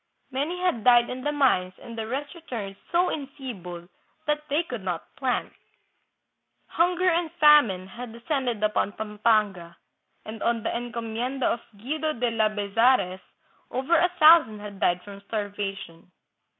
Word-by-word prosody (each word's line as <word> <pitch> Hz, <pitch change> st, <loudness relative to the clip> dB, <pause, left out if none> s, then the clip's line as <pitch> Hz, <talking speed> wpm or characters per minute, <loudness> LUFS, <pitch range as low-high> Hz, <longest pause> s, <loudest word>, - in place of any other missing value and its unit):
Many 295 Hz, +7 st, -2 dB
had 360 Hz, -, 0 dB
died 240 Hz, -1 st, +5 dB
in 255 Hz, +1 st, -5 dB
the 295 Hz, -, 0 dB
mines 220 Hz, -11 st, +2 dB
and 235 Hz, -, -10 dB
the 220 Hz, -1 st, -4 dB
rest 280 Hz, +6 st, -4 dB
returned 235 Hz, -, -6 dB, 0.2 s
so 350 Hz, +1 st, +3 dB
enfeebled 240 Hz, -, -7 dB, 0.4 s
that 300 Hz, 0 st, 0 dB
they 295 Hz, +4 st, +2 dB
could 245 Hz, -, -6 dB
not 180 Hz, -3 st, -5 dB
plant. 260 Hz, -2 st, -1 dB, 1.1 s
Hunger 355 Hz, +2 st, +1 dB
and 340 Hz, -1 st, +2 dB
famine 295 Hz, -, +5 dB
had 235 Hz, +5 st, -9 dB
de 230 Hz, -, -11 dB
scended 245 Hz, -6 st, -1 dB
upon 210 Hz, -1 st, 0 dB
Pampanga, 210 Hz, -5 st, 0 dB, 0.5 s
and 220 Hz, +1 st, -8 dB
on 230 Hz, -2 st, 0 dB
the -, -, -2 dB
encomienda 240 Hz, +2 st, -3 dB
of 235 Hz, -, +1 dB, 0.2 s
Guido 310 Hz, +8 st, -2 dB
de 240 Hz, -2 st, -1 dB
Labezares 215 Hz, -1 st, +2 dB, 0.5 s
over 265 Hz, +7 st, +1 dB
a 345 Hz, +2 st, +4 dB
thousand 310 Hz, -9 st, +7 dB
had 205 Hz, -1 st, -9 dB
died 175 Hz, +1 st, +1 dB
from 200 Hz, -1 st, -11 dB
starvation. 200 Hz, -5 st, -5 dB
235 Hz, 145 wpm, -26 LUFS, 205-290 Hz, 1.1 s, thousand